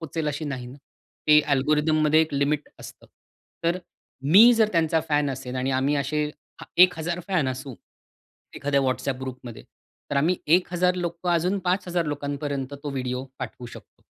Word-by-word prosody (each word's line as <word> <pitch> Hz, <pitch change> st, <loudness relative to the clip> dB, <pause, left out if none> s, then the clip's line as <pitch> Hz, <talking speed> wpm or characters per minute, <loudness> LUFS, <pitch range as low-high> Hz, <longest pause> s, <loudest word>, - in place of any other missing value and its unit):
पोहचेल 160 Hz, -1 st, -3 dB
अशी 145 Hz, +2 st, -4 dB
नाही 130 Hz, -4 st, -5 dB
ना. 125 Hz, +2 st, -11 dB, 0.5 s
ते 150 Hz, 0 st, +7 dB
अल्गोरिथममध्ये 155 Hz, +2 st, +3 dB
एक 160 Hz, -2 st, -1 dB
लिमिट 145 Hz, +2 st, 0 dB
असतं. -, -, -12 dB, 0.6 s
तर 170 Hz, +2 st, +1 dB, 0.5 s
मी 225 Hz, +6 st, +9 dB
जर 220 Hz, -2 st, +3 dB
त्यांचा 165 Hz, -2 st, +2 dB
फॅन 145 Hz, -2 st, +1 dB
असेल 130 Hz, -1 st, -6 dB
आणि 130 Hz, +1 st, -1 dB
आम्ही 140 Hz, +3 st, +1 dB
असे 145 Hz, +2 st, -1 dB, 0.4 s
हा -, -, -9 dB, 0.2 s
1000 175 Hz, -1 st, +2 dB
फॅन 170 Hz, -8 st, +1 dB
असू 130 Hz, 0 st, -6 dB, 0.8 s
एखाद्या 140 Hz, -1 st, +1 dB
व्हॉट्सॲप 130 Hz, 0 st, -1 dB
ग्रुपमध्ये. 125 Hz, -3 st, -8 dB, 0.5 s
तर 145 Hz, -, -1 dB
आम्ही 165 Hz, +6 st, +2 dB, 0.2 s
1000 180 Hz, 0 st, 0 dB
लोकं 175 Hz, 0 st, -3 dB
अजून 175 Hz, +4 st, +1 dB
5000 180 Hz, -1 st, 0 dB
लोकांपर्यंत 145 Hz, -1 st, -4 dB
तो 145 Hz, -, -4 dB
व्हिडिओ 130 Hz, -1 st, -3 dB
पाठवू 125 Hz, -1 st, -7 dB
शकतो. -, -, -14 dB
150 Hz, 150 wpm, -25 LUFS, 135-170 Hz, 0.8 s, मी